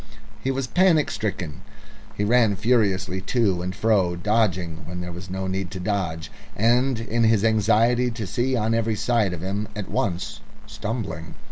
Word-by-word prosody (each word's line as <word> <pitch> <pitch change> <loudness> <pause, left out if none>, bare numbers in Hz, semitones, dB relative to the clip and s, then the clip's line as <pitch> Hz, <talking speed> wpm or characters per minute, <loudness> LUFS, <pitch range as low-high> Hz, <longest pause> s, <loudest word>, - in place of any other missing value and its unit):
He 135 - 0
was 135 0 -1
panic 170 +1 +3
stricken. 90 -7 -4 0.6
He 105 - 0
ran 110 -1 +4
furiously 95 -4 +1
to 100 -3 +1
and 90 +1 -4
fro, 100 -6 +2
dodging 90 -4 0
when 90 +1 -5
there 90 0 -5
was 90 +2 -9
no 95 +1 -3
need 95 -1 -2
to 95 - -6
dodge, 85 -6 -2 0.2
and 120 +3 +2
in 115 0 0
his 110 -2 +3
anxiety 115 +3 +3
to 115 -2 -5
see 125 +7 0
on 110 -1 +1
every 115 -1 +1
side 110 -2 +1
of 85 -3 -5
him 100 +3 -2
at 105 -2 -5
once, 90 -3 -2 0.3
stumbling. 100 -8 -5
105 Hz, 165 wpm, -24 LUFS, 90-115 Hz, 0.6 s, ran